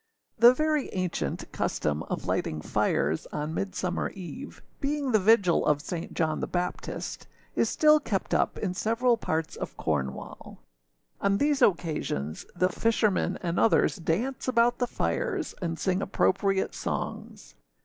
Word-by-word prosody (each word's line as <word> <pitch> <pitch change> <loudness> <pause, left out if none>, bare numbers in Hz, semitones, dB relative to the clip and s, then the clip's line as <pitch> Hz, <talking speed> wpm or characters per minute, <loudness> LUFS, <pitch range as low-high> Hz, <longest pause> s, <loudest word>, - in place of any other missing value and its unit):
[THE 235 +2 +9
very 305 -1 +1
ancient 180 - -3
custom 75 0 -1
of - - -3
lighting 80 - -1
fires 75 +2 0
on 150 +1 -3
Midsummer 185 -1 -2
eve, 195 +9 -9 0.2
being 285 -2 -1
the 215 - +5
vigil 200 -3 +4
of 150 -1 +2
St. 165 +2 -5
John 155 -2 0
the - - -2
Baptist, 180 0 -4 0.3
is - - +2
still 305 0 +5
kept 205 -10 -2
up - - +1
in 190 -4 -2
several 230 +5 +2
parts 160 -7 -2
of - - -6
Cornwall. 65 -4 -3 0.6
On 200 0 +2
these 290 +3 +1
occasions 155 - 0
the 185 +1 +2
fishermen 215 -4 +1
and 170 0 0
others 225 - +3
dance 205 +13 -2
about 240 -1 +3
the 245 - +1
fires, 400 - -2
and 165 -2 -2
sing 190 +1 0
appropriate 195 0 +1
songs. - - -5
190 Hz, 140 wpm, -28 LUFS, 165-240 Hz, 0.6 s, THE